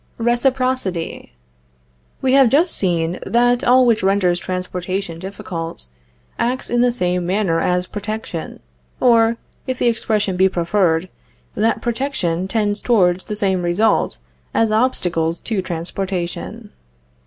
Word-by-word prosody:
RECIPROCITY. 240 - 0 0.9
We 260 0 +3
have 270 -3 +6
just 320 +7 +3
seen 170 -2 0
that 245 +1 +2
all 255 +1 +5
which 230 -3 +3
renders 190 -2 +2
transportation 185 -1 -4
difficult, 165 - -6 0.5
acts 250 +3 -1
in 240 0 +2
the 245 0 +4
same 180 -6 -1
manner 185 -3 +1
as 180 +1 +1
protection; 205 -4 -6 0.4
or, 230 -1 +4 0.3
if 260 -1 -2
the 245 - +1
expression 210 -4 0
be 190 +1 +4
preferred, 175 -1 +1 0.5
that 220 +2 0
protection 225 -8 -1
tends 205 0 0
towards 185 -6 +2
the 210 - -4
same 195 -3 0
result 185 +5 +1 0.4
as 225 -1 +2
obstacles 180 -8 0
to 215 -5 -2
transportation. 180 +1 -4
200 Hz, 120 wpm, -19 LUFS, 180-235 Hz, 0.9 s, have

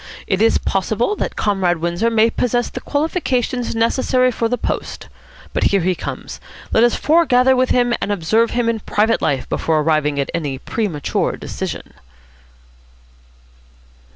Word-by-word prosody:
It 190 0 0
is 225 - +4
possible 220 - -1
that - - -3
Comrade 190 -4 +1
Windsor 170 +7 0
may 225 0 +3
possess 245 0 -1
the - - -5
qualifications 260 -6 -1
necessary 255 +2 +2
for 230 -1 -1
the 245 - 0
post. - - -4 0.5
But - - 0
here 200 -1 +3
he 185 +2 +1
comes. - - -7 0.3
Let 225 - +4
us 240 - +3
foregather 265 -5 +3
with 255 0 +1
him 245 -1 +2
and 205 - -1
observe 215 +5 +1
him 240 -1 -1
in 230 -1 0
private 215 +2 +1
life 135 -2 -1
before 160 -2 0
arriving 150 -2 +1
at 140 - -2
any 145 -5 -2
premature 170 - -2
decision." - - -6
225 Hz, 150 wpm, -19 LUFS, 175-245 Hz, 0.5 s, is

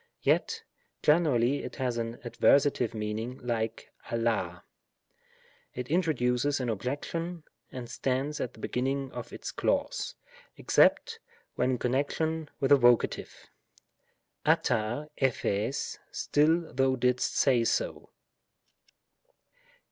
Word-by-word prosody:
Yet - - +1 0.4
generally 145 -5 +3
it - - -7
has 125 -3 -1
an 115 +1 -4
adversative 125 -1 +3
meaning 110 +4 -3
like 115 -2 -3 0.2
dXXd. 110 -7 -1 1.1
It 125 +1 -5
introduces 145 -5 +1
an 125 -2 -2
objection, 150 - -3 0.3
and 125 -2 -6
stands 135 +4 -2
at 125 - -3
the - - -16
beginning 135 +3 -2
of 120 -2 -7
its - - -6
clause, - - -1 0.4
except - - +3 0.3
when 125 - +1
in 130 - +1
connection 150 +5 -1
with 135 0 0
a 145 - +9
Voc.; 120 -2 +7
druQ - - -10 0.9
t(pr](;y 135 -4 0 0.2
" - - -39
still 160 +3 +1
thou 135 0 +2
didst 125 0 +1
say 120 -3 +4
so." - - -1
125 Hz, 110 wpm, -29 LUFS, 120-145 Hz, 1.1 s, a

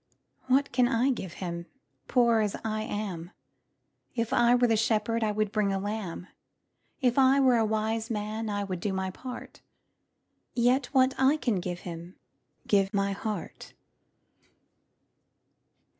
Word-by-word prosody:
What 270 +2 +3
can 245 0 +3
I 250 +2 +2
give 190 -8 -5
Him, 170 -2 -5 0.4
Poor 235 -3 +4
as 210 -2 0
I 215 0 -1
am? 195 -6 -4 0.9
If 230 -2 -1
I 240 0 +5
were 245 0 +4
a 225 - +4
shepherd, 225 +1 +1
I 215 - +1
would 215 -1 -1
bring 210 -2 +1
a 195 - 0
lamb; 195 -3 -4 0.8
If 250 0 +3
I 265 +1 +5
were 260 -3 +5
a 225 - +3
wise 220 +1 -1
man, 215 0 -3
I 205 -1 -1
would 185 -3 -4
do 195 +2 -2
my 190 0 -2
part: 250 +5 -9 0.9
Yet 245 +2 +3
what 260 -1 +3
I 270 +3 +4
can 235 -9 0
I - - 0
give 175 -1 -5
Him, 170 +1 -8 0.5
Give 195 -1 +2
my 200 -1 0
heart. 200 -1 -5
215 Hz, 150 wpm, -28 LUFS, 195-245 Hz, 0.9 s, I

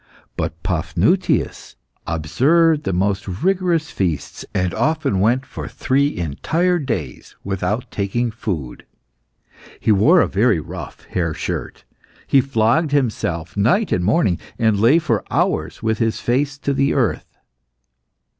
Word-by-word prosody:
But - - -4
Paphnutius - - 0 0.3
observed 150 - +2
the 95 - 0
most 100 +3 0
rigorous 170 - 0
fasts, 85 -6 -3
and 90 -1 -1
often 155 - 0
went 120 +6 +2
for - - -7
three 140 +2 0
entire 165 - 0
days 135 -5 -5
without 100 +4 -2
taking 115 +4 -1
food. 90 - -5 0.9
He - - +2
wore 135 - +5
a - - +3
very 105 -2 +2
rough 85 -2 -8
hair 85 -4 -2
shirt, - - -5 0.4
he 135 - +4
flogged 125 +4 +1
himself 85 - -1
night 125 - +2
and 90 - +1
morning, 100 - +2 0.2
and 110 -4 +2
lay 120 +9 +5
for 160 -3 0
hours - - -1
with 110 0 0
his 115 -2 0
face 135 +3 0
to 140 0 -1
the 140 +1 +1
earth. 115 - -1
115 Hz, 130 wpm, -20 LUFS, 95-145 Hz, 0.9 s, wore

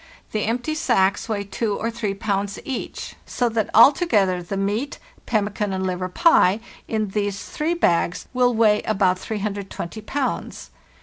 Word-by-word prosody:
The 215 - -1
empty 245 +7 -1
sacks 195 -9 +1
weigh 205 -2 -1
2 205 +1 -2
or 230 - -2
3 215 -4 -3
pounds 200 0 -2
each, 265 -3 -5
so 245 -1 0
that 220 -2 -1
alto 280 - +6
gether 190 - +2
the 185 +3 -4
meat 210 +8 -1 0.3
(pemmican 210 -2 0
and 190 0 -2
liver 185 0 -2
pie) 210 - +4 0.3
in 215 -2 -1
these 200 0 -2
three 320 +3 -1
bags 170 - +1
will 250 -1 +3
weigh 215 -2 +4
about 190 -3 +1
320 205 -1 -4
pounds. 265 +5 -3
210 Hz, 150 wpm, -23 LUFS, 195-235 Hz, 0.3 s, alto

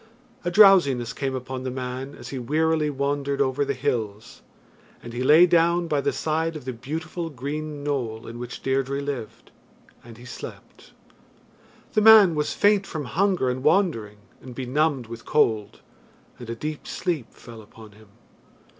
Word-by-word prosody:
A - - -1
drowsiness 175 - +5
came 135 -2 -3
upon 130 0 -5
the 130 - -4
man 130 +2 -5
as - - -10
he 135 - -5
wearily 155 +4 +1
wandered 140 0 -2
over 140 0 +1
the 140 0 -2
hills, 120 -5 -3 0.6
and 120 - -9
he 120 - -4
lay 155 +7 +7
down 170 0 +2
by 150 -3 0
the - - 0
side 160 +1 -1
of 150 - -8
the 130 - -4
beautiful 160 +7 -5
green 145 +2 -5
knoll 125 -6 -3
in 115 +1 -8
which 125 0 -8
Deirdre 135 +1 0
lived, 140 -6 -6 0.5
and 115 -2 -13
he 120 - -13
slept. 125 - -11 1.0
The 215 - +3
man 215 -5 +8
was 150 -1 -1
faint 205 -1 +3
from 155 -3 -5
hunger 185 +1 +1
and 125 +1 -2
wandering, 150 - +1 0.2
and 125 -2 -11
benumbed 135 +1 0
with 115 +1 -9
cold, 110 -8 0 0.6
and 120 -2 -9
a 115 - -3
deep 150 +5 -6
sleep 160 -10 -3
fell 115 -2 -13
upon 110 0 -15
him. 110 +1 -19
140 Hz, 165 wpm, -24 LUFS, 125-160 Hz, 1.0 s, man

